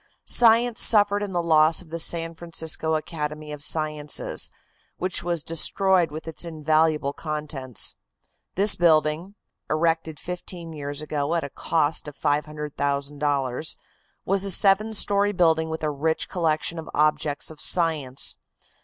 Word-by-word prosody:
Science 235 0 +4
suffered 205 -2 +4
in 205 -1 -3
the 175 -2 -1
loss 160 -1 +4
of 170 -3 -13
the 165 - -3
San 165 0 +1
Francisco 160 -1 -1
Academy 155 -1 -5
of 150 -1 -7
Sciences, 150 -1 -1 0.5
which 185 0 -2
was 170 -3 -2
destroyed 180 +2 +2
with 155 +2 -8
its 160 - -3
invaluable 155 -2 +1
contents. 150 -5 -3 0.6
This 200 +2 +5
building, 165 +2 +2 0.3
erected 160 -1 0
fifteen 175 -2 -7
years 145 0 -5
ago 150 +1 -2
at 170 - 0
a 140 - -6
cost 160 -2 0
of 145 - -9
$500,000, 145 -1 -1 0.5
was 195 0 +1
a 200 - -1
seven 205 +3 +4
story 205 0 +3
building 160 -3 +2
with 160 0 -5
a 155 - 0
rich 160 +3 -1
collection 165 -1 -1
of 160 - -9
objects 150 0 0
of 155 - -11
science. 155 -7 +1
160 Hz, 135 wpm, -24 LUFS, 150-175 Hz, 0.6 s, This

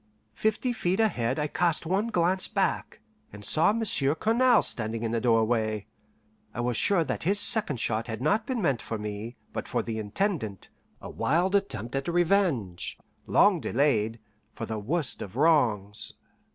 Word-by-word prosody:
Fifty 220 - 0
feet 185 -3 -1
ahead 130 - +1
I 150 - 0
cast 165 +2 0
one 195 +6 0
glance 185 -3 +1
hack, - - -1 0.3
and 105 0 -10
saw 160 - +3
Monsieur 190 -10 +1
Cournal 235 +6 +3
standing 115 0 +2
in 115 - -1
the 115 -1 -1
doorway. 110 -3 +1 0.7
I - - -5
was 120 0 -1
sure 190 - +2
that - - -4
his 200 +5 +2
second 205 - +2
shot 110 0 -1
had 110 -2 -5
not 205 - +1
been 250 -5 -2
meant 135 -8 +1
for 115 - -4
me, 105 +3 -6 0.2
but - - -4
for - - -1
the 110 -1 -4
Intendant 110 - -3 0.3
a - - -7
wild 175 +5 +1
attempt 130 - -1
at 135 0 -2
a - - 0
revenge, 170 - +1 0.3
long - - +4
delayed, 115 -5 +1 0.4
for 115 - -5
the 110 -1 -4
worst 145 +8 -2
of 100 +1 -7
wrongs. 120 -9 +1
135 Hz, 165 wpm, -27 LUFS, -, 0.7 s, long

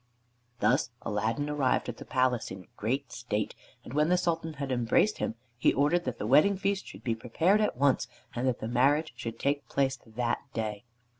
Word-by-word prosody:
Thus - - +3
Aladdin 110 +7 -1
arrived 145 -3 +1
at 120 -2 -5
the - - -9
palace 125 -2 +1
in 95 -1 -8
great 130 +4 -2
state, 110 -4 -2 0.3
and - - -9
when 150 +2 +3
the 180 - +4
Sultan 165 -2 -1
had 140 -2 -4
embraced 125 - +2
him, - - -1 0.2
he - - +5
ordered 150 +6 +2
that 125 -3 -3
the - - -3
wedding 155 - +5
feast 195 0 -1
should - - -11
be 115 - +1
prepared 160 - +2
at 210 - 0
once, 135 -3 +3 0.3
and 125 +2 -1
that 125 - 0
the 110 - -2
marriage 140 +6 +2
should 115 -1 -5
take 140 -1 -1
place 135 -2 +1
that 120 +1 -1 0.2
day. 110 -1 -3
130 Hz, 195 wpm, -29 LUFS, 115-150 Hz, 0.3 s, he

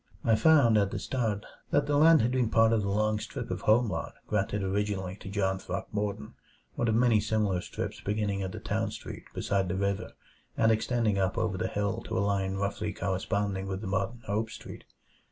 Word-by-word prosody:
I 115 - +4
found, 120 -4 +5
at 100 -1 +2
the - - -4
start, 110 -5 -2 0.2
that 145 0 +2
the 145 0 +1
land 155 -2 +6
had 120 - +1
been 125 -3 +1
part 115 0 +4
of 110 - +2
the 100 - -2
long 105 +1 +1
strip - - -6
of - - -3
home 115 +3 +4
lot 80 -5 -4
granted 105 -1 -1
originally 95 -1 -1
to 95 - -9
John 95 -1 0
Throckmorton; 100 -5 -4 0.4
one 120 - -1
of 110 - +2
many 115 -2 +4
similar 105 -4 0
strips - - -5
beginning 105 -1 -1
at 95 -1 -3
the - - -6
Town - - -1
Street - - -8
beside 95 -2 0
the 90 - -1
river 100 0 -2 0.4
and 115 0 +4
extending 110 -2 +1
up 95 -1 0
over 110 -3 0
the - - -1
hill 100 -1 -2
to - - -2
a - - +2
line 100 -1 0
roughly 100 +1 -2
corresponding 95 +1 -1
with 95 0 -3
the 110 - -5
modern 100 +5 -2
Hope 110 +3 -1
Street. - - -10
105 Hz, 205 wpm, -29 LUFS, 95-110 Hz, 0.4 s, land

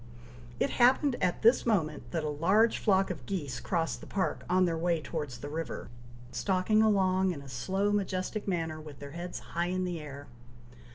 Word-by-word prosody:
It - - +1
happened 260 +2 +5
at 180 +4 0
this 230 +3 +6
moment, 155 - 0
that 165 +2 -2
a - - -1
large 190 +10 +3
flock 195 -3 +3
of 150 -8 -6
geese 145 -10 -3
crossed 165 +7 -1
the - - -10
park, 190 -1 -1
on 185 +1 +4
their 170 -2 0
way 170 0 +1
towards 150 -5 -5
the 140 - -7
river, 155 -8 -5 0.4
stalking 185 - +2
along 190 -3 +3
in 160 -6 -3
a - - -12
slow 190 +11 -1
majestic 200 +1 -1
manner, 165 -4 -2
with 150 -2 -10
their 140 0 -9
heads 175 +3 -5 0.2
high 170 +1 0
in 185 +1 -1
the 175 -2 -3
air. 145 -2 -8
175 Hz, 185 wpm, -30 LUFS, 150-195 Hz, 0.4 s, this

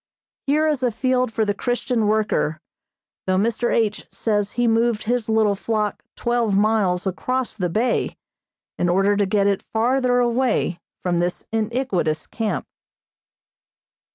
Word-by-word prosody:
Here 300 +3 +3
is 300 -4 +1
a 250 - +2
field 255 +1 0
for 220 -1 0
the 205 - +1
Christian 240 0 -1
worker, 210 -7 +1 0.7
though 185 0 +2
Mr. 230 +4 +1
H. 215 -2 0
says 205 -2 -1
he 240 0 +1
moved 230 -1 +2
his 235 0 -1
little 220 -2 +3
flock 210 0 -2
twelve 235 -4 +1
miles 205 -4 +2
across 250 +6 -2
the 180 -5 -1
bay 230 +7 0 0.6
in 175 - +2
order 195 +3 +3
to 200 -1 +1
get 200 0 +2
it 200 -1 +1
farther 245 +2 +2
away 240 -7 +1 0.2
from 175 -2 +1
this 175 +1 -2
iniquitous 215 - -1
camp. 225 -2 -3
220 Hz, 140 wpm, -22 LUFS, 200-240 Hz, 0.7 s, Here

